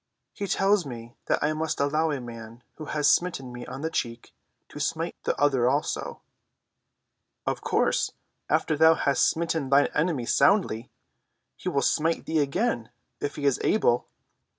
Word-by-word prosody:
"He 200 - -4
tells 195 +1 +2
me 120 -4 -8
that - - +1
I 150 +1 +2
must 155 0 -2
allow 155 +3 +1
a 145 -3 -1
man 115 -1 -10
who 155 - -7
has 150 -1 0
smitten 135 -8 +1
me 120 0 -8
on 135 - -7
one 160 - -2
cheek 115 -5 -4 0.4
to - - -9
smite - - -2
the - - -1
other 135 -4 +3
also." 145 +3 -2 1.2
"Of - - -2
course, - - +1 0.4
after 155 - +2
thou 160 +2 +6
hast 140 -5 +2
smitten 160 -4 -2
thine 140 +1 +4
enemy 150 -5 0
soundly, 125 - +2 0.7
he - - -4
will 140 -1 0
smite 165 +4 +1
thee 160 -1 0
again, 140 - 0 0.3
if 145 - -3
he 145 - -4
is 140 -3 +2
able. 120 - +2
145 Hz, 160 wpm, -26 LUFS, 125-160 Hz, 1.2 s, thou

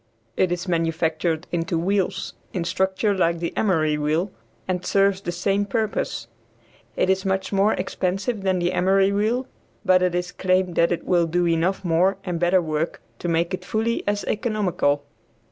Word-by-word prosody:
It 185 - +2
is 175 +2 -2
manufactured 165 -1 0
into 170 0 -1
wheels, 190 +2 -1 0.2
in 180 - -1
structure 190 +4 0
like 170 -2 +2
the 170 0 -4
emery 155 -7 +1
wheel, 155 +6 0 0.4
and 180 -1 -1
serves 195 -1 +2
the 175 - -3
same 195 +3 0
purpose. 210 - -2 0.7
It - - +1
is 190 0 +2
much 190 0 -1
more 200 +2 +3
expensive 195 +4 -2
than 190 -1 +1
the 175 0 0
emery 195 +2 +3
wheel, 220 +6 0 0.4
but 185 0 +5
it 180 -1 +1
is 180 0 -2
claimed 185 -1 +1
that 170 +1 +3
it 175 - -2
will 175 -2 +3
do 175 +2 +1
enough 170 +3 +1
more 180 +4 +3
and 175 -3 -3
better 175 +1 +3
work 155 +1 -2 0.2
to - - -4
make 170 +1 +1
it 185 - -3
fully 225 +2 -1
as 205 0 0
economical. 185 -10 0
185 Hz, 170 wpm, -23 LUFS, 170-195 Hz, 0.7 s, but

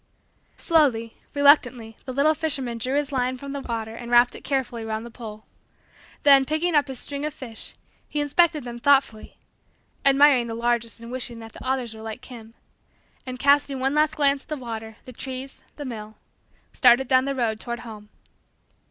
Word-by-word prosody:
Slowly, 255 -9 +2 0.2
reluctantly, 255 -6 +4
the 260 - -5
little 280 +4 +3
fisherman 275 -7 -2
drew 255 +4 -1
his 290 0 0
line 255 -1 -1
from 280 +2 -8
the 280 - -4
water 225 -3 -4
and 235 0 -8
wrapped 240 0 +5
it - - -10
carefully 255 -4 -2
round 220 0 -4
the 235 - -10
pole. 215 -3 -9 0.8
Then, 275 -2 +7
picking 315 +5 -1
up 295 -1 +3
his 265 -1 -6
string 280 +2 -5
of 300 -1 -3
fish, 230 -4 -7 0.3
he 300 - -2
inspected 300 +1 +2
them 240 -1 -7
thoughtfully 270 -5 +2 0.7
admiring 275 -3 +5
the 225 - -4
largest 235 -1 -1
and 230 +1 -9
wishing 250 -2 -4
that 225 -1 -11
the - - -11
others 255 -3 -1
were 220 - -11
like 220 -1 -7
him 230 -2 -12 0.7
and, 255 0 -5
casting 280 0 +3
one 270 +2 0
last 305 +1 +2
glance 280 -2 +2
at - - -23
the 305 - -4
water, 225 -3 -7
the 255 - -10
trees, 265 +2 -7
the 290 - -7
mill, 220 -3 -7 0.6
started 250 +1 +5
down 260 0 +4
the 275 0 -2
road 225 -4 -1
toward 235 +1 -5
home. 215 -3 -10
255 Hz, 185 wpm, -24 LUFS, 230-280 Hz, 0.8 s, Then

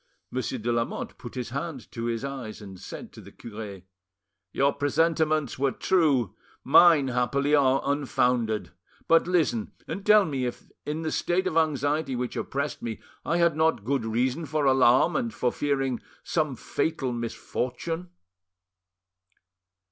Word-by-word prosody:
Monsieur 130 0 -2
de 120 +1 -2
Lamotte 115 0 -2
put 120 - -9
his 125 -2 -4
hand 140 -3 -5
to 115 -1 -4
his 115 +2 -2
eyes, 130 -6 -6
and 95 -3 -10
said - - -9
to - - -11
the - - -13
cure— 105 -4 -8 0.7
"Your 140 +1 +2
presentiments 155 0 +1
were 135 0 +2
true; 140 - +2 0.3
mine, 155 -2 +6
happily, 130 +4 +1
are 135 -2 +4
unfounded. 125 -6 0 0.4
But 165 +1 +4
listen, 160 -11 +1
and 195 +5 -5
tell 210 -1 +6
me 135 -5 -2
if 120 - -8 0.2
in 155 +2 -2
the 160 - -2
state 180 +2 0
of 180 -4 -1
anxiety 150 -2 +1
which 125 0 -3
oppressed 140 +2 -3
me 115 -2 -4 0.2
I 170 - 0
had 170 -2 +3
not 160 -9 +1
good 135 -1 0
reason 125 +8 -1
for 150 +1 0
alarm 130 -2 +5
and 115 - 0
for 120 +3 0
fearing 135 -4 -1 0.2
some 155 -5 0
fatal 135 +1 -2
misfortune." 125 +8 -4
135 Hz, 150 wpm, -27 LUFS, 120-155 Hz, 0.7 s, mine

